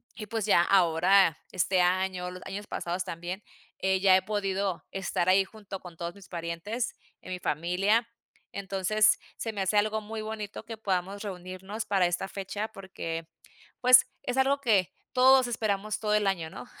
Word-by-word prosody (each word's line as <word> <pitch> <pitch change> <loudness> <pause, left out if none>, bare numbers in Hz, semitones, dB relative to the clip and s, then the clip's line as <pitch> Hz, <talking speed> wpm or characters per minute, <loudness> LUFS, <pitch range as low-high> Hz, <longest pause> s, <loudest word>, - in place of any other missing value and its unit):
y 215 - -6
pues, 225 -1 -2
ya 205 -5 +5
ahora 180 -1 +4 0.2
este 185 +1 +2
año, 180 0 0
los 180 0 -9
años 205 +2 -6
pasados 175 +2 -3
también, 175 +4 -5 0.4
eh, 190 0 +1
ya 190 -1 +6
he - - +1
podido 195 -3 -1
estar 190 -2 -1
ahí 190 +1 +5
junto 200 -1 -9
con 180 -2 -11
todos 170 +1 -5
mis 200 -2 -14
parientes 170 +7 -4 0.3
en 185 - -9
mi 180 - -3
familia. 185 +9 +1 0.4
Entonces 200 +2 +2 0.2
se 225 -1 -4
me 200 - -3
hace 195 +2 +1
algo 215 +1 +2
muy 215 +1 -6
bonito 215 -1 -6
que 225 - -6
podamos 195 -1 -2
reunirnos 190 +2 -6
para 190 -3 +3
esta 175 +2 -2
fecha 200 +2 -4
porque, 165 -5 -6 0.5
pues, 250 0 +7 0.2
es 250 +1 -2
algo 275 +1 +3
que 210 -9 +2 0.2
todos 260 0 +6
esperamos 215 -3 -1
todo 210 -1 0
el 210 -1 +3
año, 170 -5 -1
¿no? - - -8
195 Hz, 170 wpm, -28 LUFS, 180-215 Hz, 0.5 s, pues